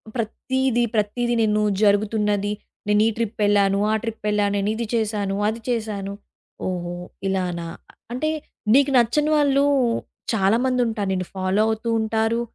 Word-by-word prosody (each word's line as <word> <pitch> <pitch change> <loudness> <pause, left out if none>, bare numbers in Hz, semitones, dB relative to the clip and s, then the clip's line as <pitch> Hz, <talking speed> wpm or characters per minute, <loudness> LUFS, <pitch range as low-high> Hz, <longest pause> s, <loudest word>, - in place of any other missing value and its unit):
ప్రతీది 245 +2 0
ప్రతీది 240 +3 0
నేను 215 -1 +2 0.2
జరుగుతున్నది 205 0 +2 0.3
నేను 210 0 +3
ఈ - - +3
ట్రిప్ 230 -1 -2
వెళ్లాను, 200 -1 +3
ఆ - - +2
ట్రిప్ 225 -2 -6
వెళ్లా, 210 -1 +2
నేను 200 0 0
ఇది 230 +1 -3
చేశాను, 210 -3 -1
అది 220 +2 -2
చేశాను. 215 -4 -2 0.5
ఓహో! 175 -1 -3 0.3
ఇలానా, 180 -3 -1 0.5
అంటే 310 +5 -1 0.4
నీకు 280 +2 +5
నచ్చని 295 +6 +2
వాళ్ళు 280 -1 +3 0.7
చాలామందుంటారు. 225 0 +1
నిన్ను 185 -1 -2
ఫాలో 190 +2 +1
అవుతూ 220 +1 -2
ఉంటారు. 225 +1 0
215 Hz, 130 wpm, -23 LUFS, 200-235 Hz, 0.7 s, నీకు